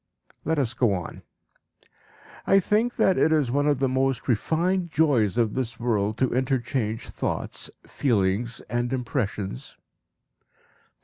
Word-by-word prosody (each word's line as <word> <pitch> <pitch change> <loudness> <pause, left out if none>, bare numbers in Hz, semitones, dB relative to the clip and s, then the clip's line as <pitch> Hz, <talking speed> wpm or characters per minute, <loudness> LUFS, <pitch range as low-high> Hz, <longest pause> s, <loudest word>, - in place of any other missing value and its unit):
Let 160 0 0
us 125 -5 0
go 120 -3 +2
on.) 90 -2 -6 1.3
"I 195 - +6
think 215 +5 +1
that 190 - +3
it 160 - +4
is 150 -6 +2
one 145 +2 +1
of 145 -2 +3
the 135 +1 +1
most 130 0 0
refined 170 - +1
joys 135 - +2
of 115 -3 +2
this 120 -3 -3
world 110 -3 0
to 130 - +1
interchange 125 -3 -1
thoughts, - - -3 0.2
feelings, 115 -1 0
and 120 +2 -2
impressions." 110 - -3
125 Hz, 130 wpm, -25 LUFS, 115-145 Hz, 1.3 s, I